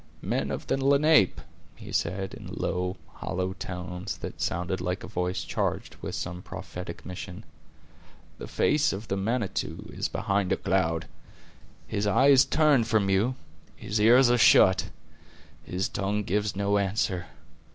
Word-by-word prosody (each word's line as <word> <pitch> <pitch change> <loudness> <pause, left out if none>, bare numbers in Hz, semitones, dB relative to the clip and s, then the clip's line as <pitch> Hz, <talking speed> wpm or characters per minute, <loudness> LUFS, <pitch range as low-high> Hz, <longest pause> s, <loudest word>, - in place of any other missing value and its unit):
"Men - - -1
of - - -4
the 135 - -1
Lenape!" 140 - +4 0.4
he - - -10
said, 95 0 -1
in - - -9
low, 90 +1 -2 0.2
hollow 95 0 -2
tones, 90 -1 -6
that - - -7
sounded 90 +2 -1
like 90 +2 -3
a - - -6
voice 90 +1 -2
charged - - -2
with - - -4
some 90 0 -5
prophetic 90 -1 -8
mission: 90 +2 -7 1.0
"the - - -7
face 150 0 +2
of 105 +4 -7
the 95 - 0
Manitou 100 0 -2
is - - -2
behind 100 -2 -1
a 95 - +2
cloud! 80 -4 0 0.8
His 105 -1 -2
eye 130 +7 +4
is 135 -1 +7
turned 145 -5 +3
from 105 -4 +2
you; 110 +7 +2 0.4
His 105 0 -3
ears 120 +3 +6
are 120 - +3
shut; 95 -3 +6 0.8
His 90 +2 -2
tongue 105 +1 -2
gives 105 +2 -1
no 100 +1 +1
answer. 95 -2 -1
100 Hz, 150 wpm, -27 LUFS, 90-115 Hz, 1.0 s, is